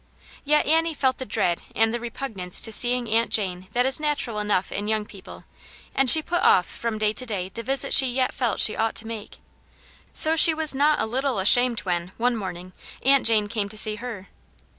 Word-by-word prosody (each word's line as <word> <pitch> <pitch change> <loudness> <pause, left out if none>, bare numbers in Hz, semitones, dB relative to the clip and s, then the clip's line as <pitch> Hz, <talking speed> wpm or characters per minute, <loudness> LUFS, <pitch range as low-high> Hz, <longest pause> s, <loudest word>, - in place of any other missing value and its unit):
Yet 300 +1 0
Annie 325 +1 0
felt 260 -2 -2
the 260 - -7
dread 175 -3 -2
and 225 0 0
the 240 - -4
repugnance 225 -6 -3
to 225 - +2
seeing 245 +2 +4
Aunt 225 +1 -1
Jane 185 -3 -1
that 245 +1 0
is 265 +2 0
natural 290 -7 -4
enough 205 -3 -3
in 205 +1 -6
young 215 -1 -3
people, 195 -3 -15 0.5
and 270 -1 +2
she 315 +5 +10
put 350 +3 -3
off 180 - +2
from 230 -2 -7
day 215 0 -2
to 255 - -2
day 200 -6 -6
the 230 - -9
visit 265 +3 -1
she 265 - +5
yet 255 +1 -3
felt 240 -4 -3
she 215 - +4
ought 225 0 -3
to 225 - -2
make. 225 -2 -10 0.7
So 315 +1 +7
she 325 0 +5
was 310 -2 -2
not 295 +2 0
a - - -1
little 260 +2 -3
ashamed 235 +5 +2
when, 175 -1 -5
one 245 +1 -1
morning, 185 -3 -9 0.3
Aunt 275 -1 +3
Jane 220 -2 +2
came 205 -1 -5
to 215 - -8
see 215 0 +2
her. 220 -4 -10
230 Hz, 210 wpm, -22 LUFS, 210-265 Hz, 0.7 s, she